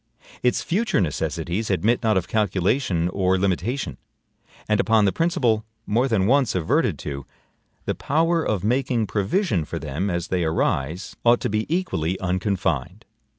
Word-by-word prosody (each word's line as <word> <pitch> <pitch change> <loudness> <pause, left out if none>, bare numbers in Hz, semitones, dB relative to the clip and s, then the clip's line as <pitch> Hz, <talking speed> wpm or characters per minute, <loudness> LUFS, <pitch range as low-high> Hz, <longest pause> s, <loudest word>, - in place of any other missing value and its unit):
Its 125 - +1
future 215 - +1
necessities 90 +4 -2
admit 105 +5 +2
not 110 -3 +2
of 90 - -1
calculation 100 -2 +1
or 95 0 +1
limitation; 95 - -1 0.7
and 105 -1 +2
upon 110 -2 +4
the 95 - +3
principle, 120 - +1 0.2
more 120 +5 +2
than 110 -7 +1
once 130 +1 +3
adverted 85 -3 +1
to, 70 -2 -5 0.6
the - - 0
power 165 +3 +1
of 100 -4 -1
making 120 0 +1
provision 105 - 0
for - - -5
them 85 +9 -3
as 85 -1 -2
they 90 -2 0
arise 80 +1 -1
ought 120 0 +5
to - - -2
be 110 +1 -1
equally 95 - -1
unconfined. 90 - -1
100 Hz, 150 wpm, -23 LUFS, 90-120 Hz, 0.7 s, ought